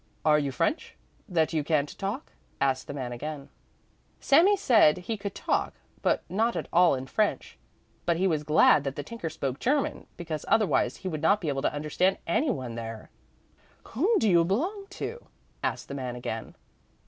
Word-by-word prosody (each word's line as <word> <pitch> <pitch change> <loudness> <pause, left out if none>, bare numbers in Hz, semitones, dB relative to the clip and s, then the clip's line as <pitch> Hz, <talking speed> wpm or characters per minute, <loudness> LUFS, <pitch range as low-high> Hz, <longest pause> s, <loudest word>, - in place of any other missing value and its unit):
"Are 150 -1 +5
you 140 -2 -1
French, 305 - -1 0.3
that 165 -3 +1
you 155 -2 +1
can't 150 -1 0
talk?" 205 +9 -4 0.3
asked 135 -1 0
the - - -5
man 130 -3 -4
again. 140 +3 -6 0.7
Sami 335 +9 +5
then - - +1
said 230 - +5
he 180 +5 -4
could 200 -1 -6
talk, - - -1 0.3
but - - +1
not 225 +5 0
at - - -3
all 175 -3 +5
in 130 0 -5
French, 210 +10 -1 0.5
but 170 -1 +2
he 185 - +1
was 160 -5 +1
glad 150 -1 +5
that 135 -1 -3
the 145 - -4
tinker 200 -1 -5
spoke 140 -3 -4
German, 280 +2 0
because 160 -3 -5
otherwise 220 -3 +2
he - - 0
would 155 -4 -3
not 200 +6 +4
be 165 -6 -3
able 135 -1 -1
to - - +1
understand 155 +6 0
anyone 170 - -1
there. 115 -1 -7 0.8
"Whom 375 - +2
do 220 - +2
you 170 -4 +5
belong 350 - -1
to?" 470 +5 -6 0.4
asked - - -2
the - - -7
man 130 -3 -4
again. 115 -2 -5
165 Hz, 185 wpm, -27 LUFS, 140-220 Hz, 0.8 s, Are